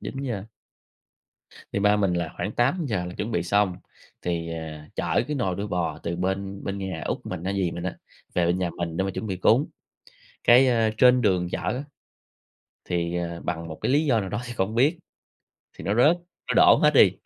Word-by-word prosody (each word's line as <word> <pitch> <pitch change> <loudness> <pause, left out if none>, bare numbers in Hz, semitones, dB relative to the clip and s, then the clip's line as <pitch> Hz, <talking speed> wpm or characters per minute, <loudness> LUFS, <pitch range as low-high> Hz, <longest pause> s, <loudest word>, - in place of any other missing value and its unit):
9:00. 125 -8 -4 1.3
Thì - - 0
ba 105 +1 +4
mình 100 -3 +1
là 85 -2 -1
khoảng 100 +4 -3
8:00 120 - 0
là 90 0 -7
chuẩn 110 +3 -4
bị 85 - 0
xong, 95 0 +1 0.5
thì, 85 -1 -2
ờ, 80 - -4 0.4
chở - - +1
cái 150 - -1
nồi 95 -9 -1
đuôi 100 +1 -3
bò 85 -5 -2
từ 85 0 -3
bên 95 +2 -3
bên 100 0 -3
nhà 95 -4 -4
út - - -1
mình 90 -2 -5
á, 95 - -1
dì 95 -3 0
mình 85 +1 -6
á 95 - -3 0.4
về 90 -1 +2
bên 90 +2 +1
nhà 90 -2 -1
mình 85 -2 -3
để 95 - +1
mà 95 - -1
chuẩn 110 - -5
bị 95 -3 -2
cúng. 115 +10 +3 0.8
Cái, 125 +3 +7
ơ, 115 -3 +3
trên 125 0 +6
đường 90 -5 +2
chở - - -1
á 130 +4 -2 1.0
thì, 85 0 -1
ờ, 85 -1 -3
bằng 85 -1 -3
một 80 - -8
cái - - +1
lý 150 +2 +3
do 120 -7 +3
nào 95 - -4
đó 105 +3 -3
thì 120 - -6
không 105 0 -1
biết, 145 +8 +3 0.8
thì - - -8
nó 100 - +1
rớt, 150 +9 +5 0.3
nó - - 0
đổ - - +7
hết - - +5
đi. - - +7
95 Hz, 215 wpm, -25 LUFS, 90-115 Hz, 1.3 s, Cái